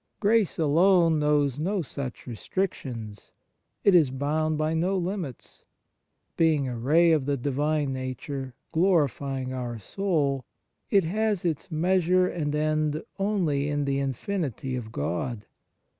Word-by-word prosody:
Grace 215 -2 +2
alone 165 +1 +4
knows 145 -2 +2
no 185 +3 0
such 135 -3 -6
restrictions; 120 - -4 0.5
it 200 - +5
is 160 -6 +6
bound 150 +4 -1
by 155 +1 0
no 180 +4 +1
limits. 180 - -5 0.7
Being 155 -4 +2
a 125 - -3
ray 155 +9 +4
of 150 -4 +2
the 140 -1 +1
Divine 145 +2 0
nature 130 0 -5 0.2
glorifying 140 - +1
our 120 -2 -4
soul, 140 - -1 0.5
it 200 -2 +4
has 210 +2 0
its 160 -4 -2
measure 180 +2 +2
and 150 -5 -2
end 155 0 0 0.2
only 175 -9 +1
in 145 -1 0
the 140 0 0
infinity 135 - -3
of 115 -3 -6
God. 105 - -3
150 Hz, 130 wpm, -26 LUFS, 135-175 Hz, 0.7 s, is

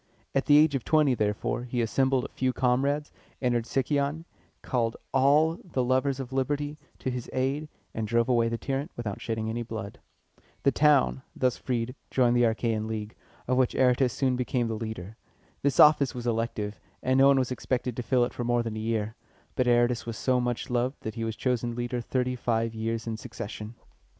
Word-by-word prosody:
At 135 - 0
the 145 - +7
age 150 0 +5
of 135 -4 -1
twenty, 155 -4 +3
therefore, 105 +2 -1
he 125 0 -3
assembled 130 +3 +1
a - - -6
few 130 -1 -1
comrades, 140 +4 +1 0.3
entered 120 -2 0
Sicyon, 140 +4 0 0.4
called 115 -3 0 0.2
all 150 +5 +4
the 135 -8 -1
lovers 130 +2 +1
of 130 -1 -6
liberty 145 +3 -1 0.2
to 130 - -3
his 125 -1 -5
aid, 135 +4 -1 0.2
and 110 -1 -3
drove 115 +1 +2
away 120 -2 +3
the 115 - -2
tyrant 135 +5 -3
without 110 -4 -4
shedding 110 -1 -2
any 115 +2 -2
blood. 110 -3 -6 0.6
The 140 - +4
town, 145 -2 +3
thus 130 -1 +1
freed, 125 -1 -2 0.2
joined 125 -2 +3
the 120 - +4
Achæan 110 -1 0
League, 110 -1 -4 0.3
of 125 0 +1
which 130 -2 +2
Aratus 125 0 +3
soon 130 0 +1
became 125 -1 0
the - - -1
leader. 110 -2 -6 0.4
This 140 0 0
office 150 -4 +6
was 120 -1 -5
elective, 110 -4 -2 0.2
and 130 +1 +3
no 135 - +7
one 140 -1 +5
was 130 -1 0
expected 125 -1 -2
to 125 - -3
fill 125 0 +2
it - - -7
for 120 - -4
more 120 0 +1
than 115 -2 -4
a - - -4
year; 110 -1 -1 0.4
but 130 - +1
Aratus 120 0 +2
was 115 -2 -4
so 125 -1 +2
much 120 0 -2
loved 125 +3 0
that 110 - -4
he 115 - -4
was 115 -1 -2
chosen 120 0 -1
leader 120 0 -2
thirty 125 +1 -1
five 115 -2 0
years 115 +1 -3
in 115 -1 -3
succession. 105 +1 -7
125 Hz, 195 wpm, -28 LUFS, 115-135 Hz, 0.6 s, the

